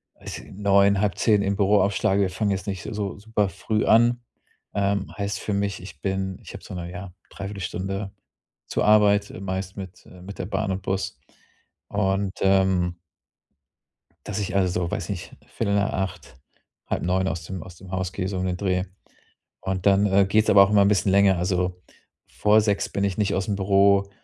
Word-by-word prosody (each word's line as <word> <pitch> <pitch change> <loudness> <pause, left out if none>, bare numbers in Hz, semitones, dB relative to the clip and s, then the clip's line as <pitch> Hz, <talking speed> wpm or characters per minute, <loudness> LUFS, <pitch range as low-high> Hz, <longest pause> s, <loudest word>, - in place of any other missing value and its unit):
also, - - -8
9, 100 0 +3
9:30 105 +1 +2
im 100 0 0
Büro 100 0 +3
aufschlage. 100 0 +1
Wir 95 - +2
fangen 100 +2 -1
jetzt 95 +1 -3
nicht 95 -3 -4
so 100 -2 -4
super 105 -1 0
früh 110 +4 -1
an. 120 +1 +4 0.5
Ähm, 100 0 0
heißt 100 -1 -2
für 105 - -3
mich, 100 -2 -1
ich 95 - -11
bin 95 -1 -2
ich - - -11
habe - - -10
so - - -9
'ne, 85 0 -6
ja, 90 0 -8 0.2
Dreiviertelstunde 95 0 -5 0.6
zur - - -1
Arbeit, 105 -1 +4
äh, - - -9
meist 95 0 -4
mit 95 -2 -9
äh 90 -1 -14
mit 100 +2 -9
der - - -3
Bahn 100 -1 -1
und 95 +1 -4
Bus 95 +1 -3 0.7
und, 95 -1 0
ähm 95 -2 +2 1.3
dass 105 0 -3
ich 100 -1 -3
also, 90 -2 +1
weiß 105 0 -3
nicht, 90 -4 -5
8:15, 100 -6 -2 0.5
8:30 95 +1 0
aus 80 0 -3
dem 95 -2 -6
aus 90 - -12
dem 95 0 -12
Haus 95 -1 -2
gehe, 95 -1 -3
so 95 -1 -3
um 90 - -1
den 90 -1 -1
Dreh. 95 -1 0 0.8
Und 95 -1 -3
dann, 100 +1 +5
äh, 95 0 +4
geht's 105 +3 +2
aber 100 -1 +8
auch 95 - +1
immer 105 -1 +5
'n - - +4
bisschen 100 -1 +2
länger. 100 -2 +5
Also, 90 0 -1 0.5
vor 105 +1 +3
6:00 105 -2 0
bin 100 - -2
ich 95 -3 -2
nicht 105 -1 +1
ausm 95 +1 -1
Büro 100 0 +3
95 Hz, 185 wpm, -24 LUFS, 95-100 Hz, 1.3 s, aber